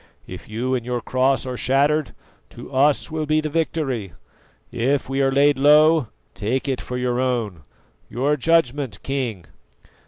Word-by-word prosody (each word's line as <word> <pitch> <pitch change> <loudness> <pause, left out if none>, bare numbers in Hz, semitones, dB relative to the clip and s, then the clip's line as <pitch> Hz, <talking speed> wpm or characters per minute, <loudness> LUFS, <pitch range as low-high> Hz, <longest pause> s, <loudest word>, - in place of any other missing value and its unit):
If 90 +6 -10
you 120 +4 -2
and 125 -2 -1
your 125 0 -2
cross 130 +3 0
are 130 -1 -4
shattered, 140 +4 +1 0.3
to 120 +3 -12
us 145 +4 +2
will 155 -1 -3
be 155 +1 +2
the 155 0 -3
victory; 145 - -2 0.6
if 135 +4 0
we 135 +1 -1
are 135 0 +2
laid 140 0 +3
low, 150 0 +5 0.3
take 125 +7 -2
it 130 -3 -2
for 125 - -5
your 125 -1 -1
own. 115 -9 -2 0.5
Your 140 +5 0
judgment, 140 - +1
King!" 125 - -3
135 Hz, 155 wpm, -22 LUFS, 125-145 Hz, 0.6 s, low